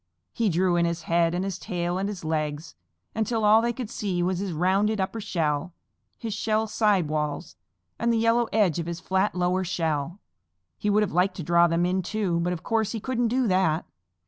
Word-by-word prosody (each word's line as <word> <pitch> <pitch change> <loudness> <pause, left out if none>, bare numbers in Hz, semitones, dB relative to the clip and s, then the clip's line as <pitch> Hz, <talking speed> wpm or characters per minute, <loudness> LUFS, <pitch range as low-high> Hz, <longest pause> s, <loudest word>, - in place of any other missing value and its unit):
He 230 -3 +1
drew 180 0 +2
in 170 - +3
his 170 -1 -2
head 170 +1 +2
and 185 +2 -1
his 195 -2 -4
tail 175 -2 -2
and 195 +1 -1
his 190 -5 -7
legs, 155 0 -2 0.4
until 220 0 0
all 215 +2 +6
they 235 +1 +1
could 240 -2 -6
see 185 -6 -2
was 180 0 0
his 195 -1 -3
rounded 195 +6 +1
upper 195 +4 -2
shell, 165 -2 -1 0.4
his 225 -2 -4
shell 220 +1 0
side 205 -5 +2
walls, 150 - -3 0.4
and 235 0 +1
the 230 - +2
yellow 230 +1 +2
edge 200 -7 +2
of 165 - -4
his 170 0 -4
flat 190 +2 0
lower 180 +1 +1
shell. 165 -1 -2 0.6
He 210 - -1
would 210 +1 +3
have 205 - -2
liked 180 +2 +2
to 175 - -5
draw 170 +2 +4
them 170 +1 +1
in 185 +1 +1
too, 185 -3 -1
but 175 +1 0
of 175 -2 -4
course 225 -1 0
he 225 - -3
couldn't 245 +1 -1
do 250 +1 +1
that. 185 -3 +2
185 Hz, 210 wpm, -26 LUFS, 170-215 Hz, 0.6 s, all